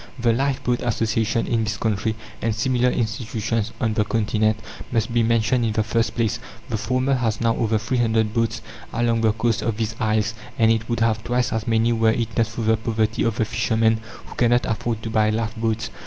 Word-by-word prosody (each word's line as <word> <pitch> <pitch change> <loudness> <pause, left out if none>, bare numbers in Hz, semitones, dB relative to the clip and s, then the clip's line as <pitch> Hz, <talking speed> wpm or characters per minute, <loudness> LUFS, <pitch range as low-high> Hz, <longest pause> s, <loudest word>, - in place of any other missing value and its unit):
The 120 -2 +2
Lifeboat 125 -1 0
Association 115 -1 0
in 115 -1 0
this 110 -1 -2
country, 110 0 -1 0.3
and 110 -1 0
similar 125 +2 +2
institutions 115 -1 -2
on 115 -3 +1
the 105 - +2
Continent, 110 0 +1 0.3
must 115 0 0
be 120 - +3
mentioned 115 +2 +2
in 110 -2 0
the 110 - +1
first 115 +2 0
place. 115 -3 0 0.3
The 110 - -1
former 130 +4 0
has 115 -4 0
now 115 -1 +2
over 110 -1 +1
three 125 +4 -1
hundred 110 -2 +1
boats 115 -2 -1 0.3
along 115 -1 +1
the 110 -1 +4
coasts 115 +1 0
of 115 -2 -1
these 110 -1 -2
isles, 110 -1 +1 0.2
and 115 0 +4
it 115 +1 -1
would 115 -1 -1
have 110 -1 +1
twice 120 0 0
as 110 +1 -2
many 115 +1 +3
were 115 -1 +3
it 115 0 -1
not 115 -2 +2
for 110 +1 -6
the 110 0 +3
poverty 110 -1 -1
of 115 -2 +1
the 110 - +1
fisher 110 0 -1
men, 110 0 +3 0.3
who - - -11
cannot 120 0 +2
afford 110 0 -2
to 115 - -4
buy 110 -1 +3
lifeboats. 110 0 -1
115 Hz, 210 wpm, -23 LUFS, 110-115 Hz, 0.3 s, the